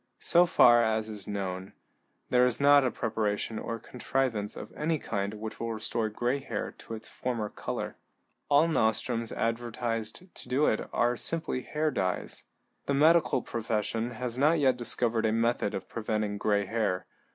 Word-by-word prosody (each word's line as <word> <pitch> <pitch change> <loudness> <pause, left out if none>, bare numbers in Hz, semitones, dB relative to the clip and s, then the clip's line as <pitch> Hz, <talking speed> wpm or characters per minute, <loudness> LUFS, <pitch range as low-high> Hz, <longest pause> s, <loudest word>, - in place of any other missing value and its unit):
So 175 +1 +5
far 120 -7 +6
as 110 -1 0
is 105 -2 -7
known, 95 -2 -4 0.6
there 125 0 +5
is 125 - -1
not 145 0 +6
a 130 - +2
preparation 110 -1 -2
or 115 - -4
contrivance 120 -2 -2
of - - -9
any 155 +1 0
kind 100 -6 -3
which 110 +1 -7
will 115 0 -2
restore 110 0 -2
gray 120 +5 -1
hair 115 -6 -4
to 115 - -7
its 110 - -10
former 115 -4 -3
color. - - -5 0.5
All 145 +3 +5
nostrums 115 -4 +1
advertised 115 - -3
to - - -8
do 135 +4 +3
it 110 - 0
are 120 +1 +2
simply 160 -1 -1
hair 155 +3 -1
dyes. 95 -7 -2 0.4
The 140 - +1
medical 155 -3 +4
profession 115 0 -2
has 125 0 -4
not 155 +4 +4 0.2
discovered 120 -2 +1
a - - +1
method 115 -2 +1
of - - -5
preventing 105 -2 -2
gray 100 -1 +1
hair. 105 -3 -1
115 Hz, 160 wpm, -29 LUFS, 110-125 Hz, 0.6 s, far